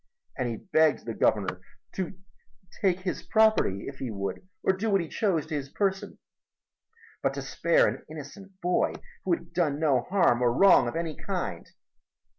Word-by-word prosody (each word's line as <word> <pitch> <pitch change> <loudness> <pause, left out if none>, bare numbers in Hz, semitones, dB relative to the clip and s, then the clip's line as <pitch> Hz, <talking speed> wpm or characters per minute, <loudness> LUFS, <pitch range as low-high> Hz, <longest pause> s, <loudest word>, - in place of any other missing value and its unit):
And 125 -2 -1
he 115 - -3
begged 160 - +2
the 115 - -3
Governor 95 -5 +1 0.3
to 190 -1 -4 0.6
take 185 -2 +2
his 185 -1 -3
property 220 - +2
if 135 -1 -8
he 130 - -3
would 100 -3 -4 0.2
or - - +4
to 190 - -5
do 220 +2 0
what 195 -1 +3
he 170 - -3
chose 180 -5 0
to 160 - -7
his 140 -2 -3
person, 195 +3 -2 1.0
but - - 0
to - - -4
spare - - +3
an - - -3
innocent 185 +6 -10
boy 180 0 +1 0.3
who - - +2
had 335 - -4
done 150 -5 +1
no 140 -6 +3
harm 180 -11 +3
or 120 -1 +4
wrong 190 -4 +6
of 120 - -4
any 165 -2 -2
kind. - - -4
160 Hz, 180 wpm, -28 LUFS, 130-195 Hz, 1.0 s, wrong